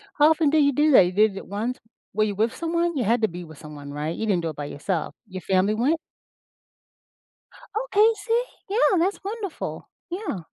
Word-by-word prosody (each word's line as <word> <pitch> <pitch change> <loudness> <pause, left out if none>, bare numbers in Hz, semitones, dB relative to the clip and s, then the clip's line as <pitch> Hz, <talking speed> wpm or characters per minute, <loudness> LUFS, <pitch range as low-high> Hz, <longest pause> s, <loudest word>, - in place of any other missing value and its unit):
How 300 +1 +6
often 315 -2 +3
do 310 - +2
you 285 -1 +5
do 300 +2 +3
that? 195 -8 +8
You 180 - -1
did 205 0 +3
it - - -8
once. 225 +6 -3 0.4
Were 215 +1 +2
you 205 -2 -1
with 225 +3 0
someone? 335 0 -1
You 245 - +1
had 230 +3 +2
to 220 - +4
be 175 +1 -8
with 155 -3 -12
someone, 145 -2 -9
right? 150 +3 -3
You 220 - -3
didn't 190 -5 +1
do 165 - -2
it 155 - -7
by 145 - -5
yourself. 160 +3 -3
Your 185 -2 -7
family 190 +4 +2
went? 275 +9 +1 1.9
Okay. 440 -2 +4
See. 465 +3 0 0.3
Yeah, 405 -3 +3
that's 380 +4 +1
wonderful. 405 -3 -5 0.2
Yeah. 360 - -4
220 Hz, 205 wpm, -24 LUFS, -, 1.9 s, that